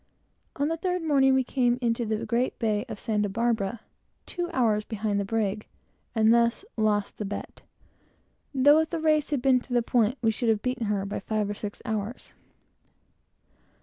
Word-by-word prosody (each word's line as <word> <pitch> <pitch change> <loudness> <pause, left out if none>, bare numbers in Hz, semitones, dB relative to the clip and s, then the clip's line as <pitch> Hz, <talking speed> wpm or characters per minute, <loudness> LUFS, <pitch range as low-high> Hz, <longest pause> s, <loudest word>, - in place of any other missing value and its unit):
On 285 - 0
the 330 +1 -1
third 360 +1 -1
morning, 270 -4 +4
we 265 - +3
came 245 -1 +1
into 235 -1 0
the 220 +1 -2
great 235 +3 0
bay 215 -3 0
of - - -6
Santa 210 -3 0
Barbara, 225 0 -1 0.4
two 350 -1 -3
hours 225 -7 +2
behind 210 -2 -2
the 200 - -1
brig, 210 -1 -1 0.5
and 220 0 +5
thus 235 +9 +2
lost 210 -2 0
the - - -2
bet; 205 0 -6 0.9
though, 290 +3 +5
if 320 - 0
the 335 - -2
race 310 -2 +2
had 285 -4 -1
been 260 -2 +5
to 245 +1 -9
the 240 -1 +3
point, 240 +1 +2
we 225 - +4
should 230 +2 -1
have 215 -2 +1
beaten 250 -3 -1
her 200 -1 0
by 200 - -4
five 215 +1 -1
or - - -2
six 205 0 -7
hours. 220 0 -4
230 Hz, 180 wpm, -27 LUFS, 210-260 Hz, 0.9 s, and